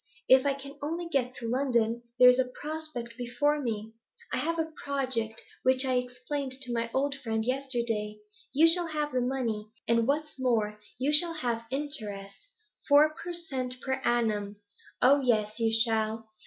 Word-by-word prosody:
If 260 +2 +5
I 275 - +1
can 280 +1 -11
only 335 +4 -4
get 270 -6 -1
to 235 - -6
London, 235 -2 0 0.2
there's 250 0 +6
a 255 -1 0
prospect 300 -7 -6
before 290 +5 0
me; 220 -3 -4 0.4
I - - +1
have 335 +1 -1
a 320 0 -2
project 260 -6 -2 0.2
which 260 +1 +5
I 260 - 0
explained 250 +2 -3
to 255 -2 -2
my 230 0 -2
old 275 +2 0
friend 220 -2 -2
yesterday. 235 -5 -2 0.3
You 305 +5 +5
shall 345 +1 +8
have 300 -2 -3
the 255 - 0
money, 240 -4 -2 0.2
and, 230 0 +2
what's 300 0 -2
more, 220 -5 0 0.2
you 275 +4 0
shall 330 +3 +8
have 235 -6 -3
interest 235 - -4 0.4
four 300 +2 +5
per 345 +2 -8
cent. 260 -7 -4
per 265 0 -3
annum. 215 -4 0 0.5
Oh 280 +2 +5
yes, 220 -3 0
you 225 -1 +1
shall. 225 -1 +1
255 Hz, 165 wpm, -28 LUFS, 230-285 Hz, 0.5 s, shall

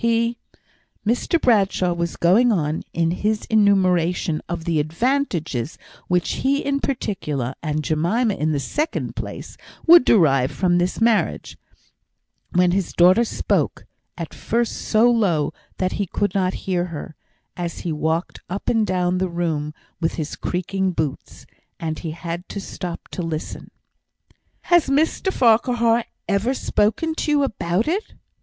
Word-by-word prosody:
He 230 0 +1 0.4
" - - -36 0.3
Mr 245 +9 +1
Bradshaw 195 - +2
was 170 -1 -3
going 220 +8 +4
on 155 -6 0
in 165 0 +1
his 210 +4 -1
enumeration 180 -6 +2
of 170 -1 -4
the 165 -3 +1
advantages 165 - -1 0.3
which 180 -1 0
he 280 +2 +1
in 280 0 +1
particular, 150 - -2
and 155 -1 -2
Jemima 180 - +1
in 155 -3 -1
the 145 - 0
second 295 - -2
place, - - -7 0.3
would 345 -3 +9
derive 135 - +4
from 175 +5 +1
this 180 +1 -1
marriage, 225 -1 +1 1.0
when 180 0 +3
his 190 -1 -1
daughter 185 +6 +5
spoke, 230 - -1 0.3
at - - -6
first 235 0 -1
so 230 +2 +3
low 185 -11 +1 0.2
that 185 -1 0
he 200 - -2
could 205 +2 -1
not 190 -1 0
hear 180 -2 0
her, 160 -2 -7 0.4
as 175 -1 -4
he 170 - -3
walked 160 +3 -1
up 195 +3 -3
and 225 -2 +2
down 180 -1 0
the 185 0 0
room 160 -3 -2 0.3
with 165 -1 -1
his 155 -2 -4
creaking 185 +1 -2
boots, 155 -4 -4 0.3
and 160 -1 -3
he 165 - -5
had 170 +2 -6
to 200 - -5
stop 180 -3 -6
to - - -5
listen. 165 -2 -5 0.9
"Has 345 -4 +3
Mr 315 +7 +1
Farquhar 235 -2 +3 0.2
ever 210 +7 +1
spoken 260 +9 0
to - - -1
you 295 -1 +3
about 200 - -1
it?" 380 +7 -2
185 Hz, 150 wpm, -22 LUFS, 165-230 Hz, 1.0 s, would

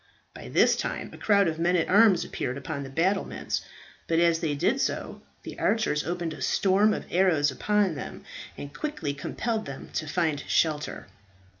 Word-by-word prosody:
By - - -10
this - - +4
time - - -4
a - - -10
crowd 200 -3 +3
of 160 0 -2
men 175 +2 +2
at 170 - +1
arms 200 -3 +5
appeared 125 +2 -4
upon 140 0 -5
the 135 - -7
battlements. 180 +8 -1 0.5
But 165 - +1
as 170 -1 +3
they 160 -4 -1
did 245 - +1
so - - -3 0.2
the - - -8
archers 210 -10 +1
opened 170 -1 -3
a 150 - -10
storm 195 +9 +3
of - - -3
arrows 165 -6 +3
upon 205 +5 +1
them, 140 - -7 0.3
and 145 0 -8
quickly 165 - -3
compelled 220 - -3
them 135 -1 -8
to 155 - -2
find 155 -2 0
shelter. 155 -2 0
170 Hz, 175 wpm, -27 LUFS, 150-200 Hz, 0.5 s, arms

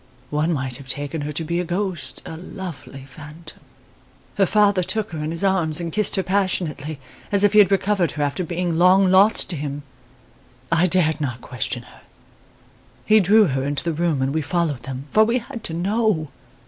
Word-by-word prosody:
One 150 +3 0
might 130 -5 -2
have 135 -2 -13
taken 145 +3 -3
her 145 +1 -4
to 165 - -1
be 170 +2 -2
a - - 0
ghost 175 -7 -3
a - - -7
lovely 165 -6 -9
phantom. 150 +4 -12 0.7
Her 195 -2 +2
father 205 -2 +3
took 215 +3 -3
her 160 - -5
in 150 +1 -3
his 165 +3 -1
arms 180 -5 +2
and 170 -2 -5
kissed 210 -2 +2
her 190 - 0
passionately, 180 -6 -1 0.3
as 200 0 +3
if 205 - +4
he 210 - +6
had 200 -3 +6
recovered 195 -4 +1
her 150 - -2
after 145 +6 -2
being 175 0 -2
long 185 +1 +5
lost 195 +3 +4
to - - -3
him. 145 -1 -5 0.9
I 165 +2 +3
dared 160 -4 +2
not 130 -4 -3
question 125 -3 -3
her. - - -18 1.0
He 215 0 +5
drew 210 +3 +5
her 135 0 -1
into 145 +1 -2
the 170 - -1
room 160 -4 0
and 135 +1 -1
we 160 - 0
followed 160 -3 -1
them, 130 +2 -7
for 215 - +5
we 230 +3 +1
had 240 -1 -8
to 160 - -4
know! 195 -3 0
170 Hz, 200 wpm, -22 LUFS, 145-195 Hz, 1.0 s, he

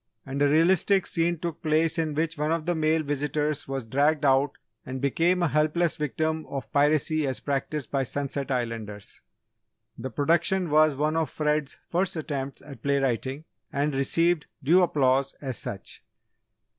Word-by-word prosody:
And 135 +1 -4
a 145 - +4
realistic 180 +5 +4
scene 170 +1 0
took 170 -1 -5
place 160 +1 +1
in 155 -2 -1
which 165 +2 0
one 150 +1 -1
of 165 -1 -1
the 175 - +1
male 160 0 +1
visitors 145 +1 -1
was 135 -3 -3
dragged 145 +5 +2
out 135 +1 +3 0.3
and 130 +1 -5
became 170 +7 +2
a - - +4
helpless 155 +3 +1
victim 155 +2 -2
of 135 -3 -6
piracy 150 +1 +2
as 130 - -2
practised 140 0 -3
by 140 - +1
Sunset 140 +1 -3
Islanders. 115 -5 -4 0.8
The 130 +3 -4
production 170 - +1
was 155 -1 +5
one 150 +3 0
of 165 -1 0
Fred's 150 -2 -1
first 185 +2 0
attempts 140 -4 -4
at 140 -5 -11
play 140 +2 +1
writing, 135 +2 -1 0.3
and 145 +1 0
received 165 +4 +1 0.2
due 170 +7 +5
applause 135 -5 +2
as 130 -4 -4
such. 100 - -6
150 Hz, 160 wpm, -26 LUFS, 135-160 Hz, 0.8 s, was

